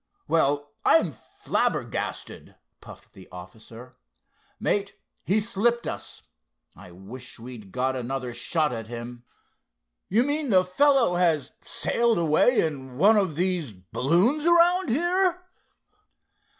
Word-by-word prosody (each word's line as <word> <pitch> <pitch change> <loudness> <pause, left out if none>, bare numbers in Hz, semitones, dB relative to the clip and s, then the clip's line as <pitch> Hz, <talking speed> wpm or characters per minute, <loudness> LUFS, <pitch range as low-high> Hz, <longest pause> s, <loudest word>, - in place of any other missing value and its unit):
"Well, 145 -2 +1
I'm 210 -7 +4
flabbergasted!" - - -3 0.2
puffed - - -15
the 95 - -14
officer. 110 +7 -12 0.6
"Mate, 200 -1 -1 0.3
he's 210 +3 0
slipped 235 +2 0
us. - - -7 0.5
I 95 0 -13
wish 105 +9 -10
we'd 115 -4 -11
got 130 +3 -1
another 125 0 -4
shot 155 +4 0
at 115 -2 -6
him. 120 +1 -8 0.8
You 225 +6 +3
mean 290 +1 -2
the 185 -3 +4
fellow 240 -1 +3
has 165 -3 +1
sailed 235 -1 0
away 170 +9 +3
in 130 -5 -6
one 205 +8 +5
of 190 -7 +1
these 175 - -1
balloons 170 - 0
around 345 +1 +4
here?" 360 +6 +1
165 Hz, 115 wpm, -25 LUFS, -, 0.8 s, one